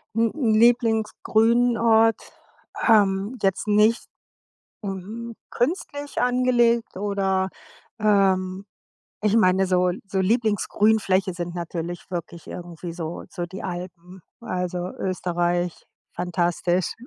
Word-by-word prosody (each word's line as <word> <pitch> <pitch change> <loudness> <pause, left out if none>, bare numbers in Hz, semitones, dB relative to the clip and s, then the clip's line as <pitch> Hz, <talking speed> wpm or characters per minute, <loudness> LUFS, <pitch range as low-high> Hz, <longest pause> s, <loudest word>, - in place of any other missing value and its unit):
Hm, 230 0 +2
'n 245 -8 +1
Lieblingsgrünort, 225 0 +3 0.7
ähm, 205 +1 +3
jetzt 195 +2 0
nicht, 210 +2 +3 0.8
hm, 210 +4 -6 0.2
künstlich 285 +1 -2
angelegt 245 -3 +2
oder, 195 -1 0 0.5
ähm 195 -2 +2 0.6
Ich 210 +1 +2
meine 190 -2 +4
so 180 0 +2 0.2
so 195 -1 -1
Lieblingsgrünfläche 205 -2 +2
sind 175 0 -5
natürlich 170 0 -5
wirklich 170 -1 -6
irgendwie 175 -1 -7
so 165 -1 -5
so 175 - -4
die 190 +2 -8
Alpen. 180 0 -7 0.2
Also, 180 -4 -3
Österreich, 175 -1 -1 0.3
fantastisch 175 0 0
195 Hz, 95 wpm, -24 LUFS, 180-225 Hz, 0.8 s, meine